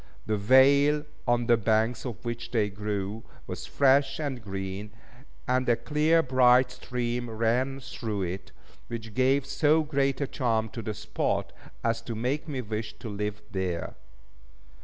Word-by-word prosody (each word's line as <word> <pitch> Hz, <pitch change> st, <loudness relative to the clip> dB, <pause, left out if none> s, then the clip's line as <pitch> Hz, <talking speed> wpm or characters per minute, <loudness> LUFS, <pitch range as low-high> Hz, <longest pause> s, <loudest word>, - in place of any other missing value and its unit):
The 110 Hz, -, 0 dB
vale, 140 Hz, +7 st, +5 dB, 0.2 s
on 120 Hz, 0 st, +2 dB
the 120 Hz, 0 st, +5 dB
banks 110 Hz, +3 st, +1 dB
of 120 Hz, -2 st, -8 dB
which 120 Hz, 0 st, -4 dB
they 110 Hz, -4 st, +1 dB
grew, 105 Hz, +1 st, -3 dB, 0.2 s
was -, -, -6 dB
fresh 135 Hz, 0 st, +3 dB
and 140 Hz, -5 st, -3 dB
green, 95 Hz, +1 st, -5 dB, 0.6 s
and 130 Hz, 0 st, +1 dB
a 120 Hz, -, +5 dB
clear, 150 Hz, +6 st, +2 dB
bright 125 Hz, -1 st, +5 dB
stream 125 Hz, -1 st, -3 dB
ran 120 Hz, +4 st, 0 dB
through 115 Hz, -6 st, -4 dB
it, 90 Hz, +1 st, -5 dB, 0.4 s
which 115 Hz, -2 st, -6 dB
gave 130 Hz, +2 st, +3 dB
so 155 Hz, +3 st, +3 dB
great 140 Hz, -3 st, 0 dB
a 140 Hz, -, +1 dB
charm 115 Hz, -5 st, 0 dB
to 115 Hz, -, -6 dB
the 110 Hz, -1 st, -4 dB
spot, 105 Hz, -, -2 dB, 0.3 s
as 115 Hz, 0 st, 0 dB
to 115 Hz, 0 st, -5 dB
make 130 Hz, +8 st, -2 dB
me 135 Hz, -4 st, -3 dB
wish 110 Hz, -1 st, -5 dB
to 115 Hz, -, -7 dB
live 105 Hz, 0 st, -4 dB
there. 90 Hz, -3 st, -2 dB
120 Hz, 155 wpm, -28 LUFS, 110-135 Hz, 0.6 s, vale